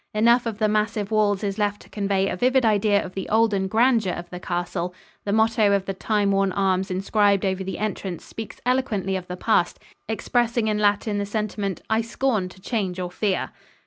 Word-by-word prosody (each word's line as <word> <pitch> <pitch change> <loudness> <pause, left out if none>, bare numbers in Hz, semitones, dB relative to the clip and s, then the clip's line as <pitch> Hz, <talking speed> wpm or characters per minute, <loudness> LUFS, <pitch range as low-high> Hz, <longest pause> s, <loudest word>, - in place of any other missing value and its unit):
Enough 235 +3 +4
of 220 -3 -3
the 215 -1 +2
massive 210 0 0
walls 210 -2 +2
is 200 +1 -2
left 205 0 0
to - - -19
convey 195 -2 0
a - - -2
vivid 255 +5 +2
idea 210 -1 +3
of 185 - -9
the 190 -1 -5
olden 215 -3 +2
grandeur 225 -2 +3
of 175 - -6
the 180 - -6
castle. 175 0 -3 0.3
The 200 - -1
motto 220 -1 +3
of 195 -1 +1
the 195 - -3
time 205 +1 0
worn 195 -1 +2
arms 190 -1 +1
inscribed 200 +1 +2
over 190 0 -1
the 190 - -4
entrance 195 -4 -4
speaks 225 -1 -8
eloquently 225 -7 0
of 185 -1 -4
the 180 - -6
past, 180 -4 +1 0.3
expressing 235 0 0
in 210 0 0
Latin 205 0 +1
the 200 - -1
sentiment, 205 -3 -3
"I 220 +1 +2
scorn 230 -4 -1
to 185 - -16
change 190 -3 -2
or 180 -1 -3
fear." 195 0 -1
205 Hz, 200 wpm, -24 LUFS, 190-220 Hz, 0.3 s, Enough